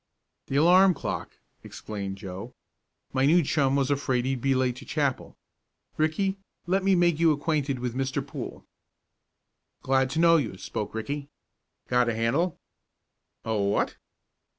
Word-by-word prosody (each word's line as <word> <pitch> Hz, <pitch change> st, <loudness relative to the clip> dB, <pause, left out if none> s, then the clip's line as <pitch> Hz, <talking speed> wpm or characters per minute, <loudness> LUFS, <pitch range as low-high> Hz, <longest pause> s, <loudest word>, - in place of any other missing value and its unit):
"The 135 Hz, -, -3 dB
alarm 180 Hz, +5 st, +6 dB
clock," -, -, -5 dB, 0.3 s
explained 100 Hz, -2 st, -6 dB
Joe. 95 Hz, +3 st, -8 dB, 0.6 s
"My 135 Hz, +1 st, +3 dB
new 170 Hz, +3 st, +5 dB
chum 140 Hz, -2 st, +1 dB
was 140 Hz, 0 st, +1 dB
afraid 130 Hz, -3 st, 0 dB
he'd 130 Hz, -2 st, -1 dB
be 135 Hz, +1 st, +2 dB
late 130 Hz, -1 st, +1 dB
to -, -, -10 dB
chapel. 140 Hz, -4 st, -2 dB, 0.6 s
Ricky, 190 Hz, +6 st, 0 dB, 0.3 s
let 190 Hz, +2 st, +1 dB
me 195 Hz, 0 st, +4 dB
make 175 Hz, -3 st, +3 dB
you 165 Hz, -1 st, +5 dB
acquainted 145 Hz, -2 st, 0 dB
with 125 Hz, -1 st, -3 dB
Mr. 135 Hz, +1 st, -2 dB
Poole." -, -, -7 dB, 1.2 s
"Glad 130 Hz, 0 st, +2 dB
to 140 Hz, -, -2 dB
know 165 Hz, 0 st, +6 dB
you," 115 Hz, -, -2 dB
spoke 105 Hz, +2 st, -5 dB
Ricky. 140 Hz, +6 st, -4 dB, 0.6 s
"Got 125 Hz, -1 st, +2 dB
a 115 Hz, -, -1 dB
handle?" 140 Hz, +10 st, 0 dB, 0.9 s
"A 110 Hz, -1 st, -1 dB
what?" 100 Hz, -1 st, 0 dB
135 Hz, 145 wpm, -27 LUFS, 120-160 Hz, 1.2 s, alarm